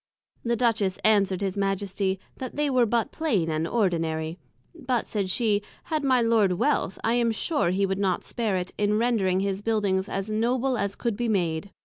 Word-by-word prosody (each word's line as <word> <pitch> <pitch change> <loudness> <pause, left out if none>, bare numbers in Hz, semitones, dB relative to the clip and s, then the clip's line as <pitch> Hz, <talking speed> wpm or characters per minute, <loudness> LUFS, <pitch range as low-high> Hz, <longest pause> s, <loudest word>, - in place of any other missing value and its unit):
The 235 0 +1
Duchess 220 -5 +1
answer'd 200 -3 +3
his 195 -2 -1
Majesty, 195 -1 -1 0.2
That 255 -2 -6
they 295 -1 0
were 250 -2 +3
but 230 0 0
plain 210 - 0
and 155 +1 -1
ordinary; 165 -5 -1 0.3
but, 250 -3 -2
said 200 -3 -2
she, 210 0 +1 0.2
had 310 -2 -2
my 255 -3 +3
Lord 220 -5 +3
Wealth, 180 +1 0
I 225 - +2
am 240 -1 +2
sure 285 - 0
he 195 +2 +1
would 190 0 -2
not 190 -3 0
spare 225 -5 -2
it, 180 0 -3
in 210 0 +2
rendring 210 -6 +1
his 195 0 -2
Buildings 205 -3 0
as 195 +2 -3
Noble 245 +4 +1
as 200 -3 -2
could 235 -4 -2
be 240 +1 -1
made. 175 -3 0
205 Hz, 190 wpm, -26 LUFS, 190-235 Hz, 0.3 s, answer'd